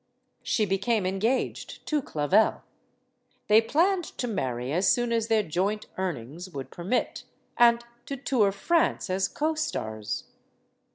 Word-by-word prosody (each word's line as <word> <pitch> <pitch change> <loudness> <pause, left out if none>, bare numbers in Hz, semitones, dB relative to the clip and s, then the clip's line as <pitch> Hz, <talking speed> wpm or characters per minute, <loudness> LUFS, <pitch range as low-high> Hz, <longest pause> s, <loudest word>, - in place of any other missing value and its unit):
She 215 - +1
became 200 +2 0
engaged 210 +8 -1
to 300 -2 0
Clavel. 185 - +2 0.8
They 215 +1 +7
planned 345 - +2
to 245 - -2
marry 130 - -2
as 180 +4 +3
soon 240 -1 +1
as 230 -1 +1
their 220 -2 +3
joint 195 +5 -1
earnings 175 -1 -4
would 140 -6 -7
permit, 190 +9 -2 0.3
and 235 0 +5 0.2
to 275 - -4
tour 245 -6 +2
France 320 - +1
as 190 +1 +1
co 310 +2 -1
stars. 110 - -3
210 Hz, 130 wpm, -27 LUFS, 180-245 Hz, 0.8 s, They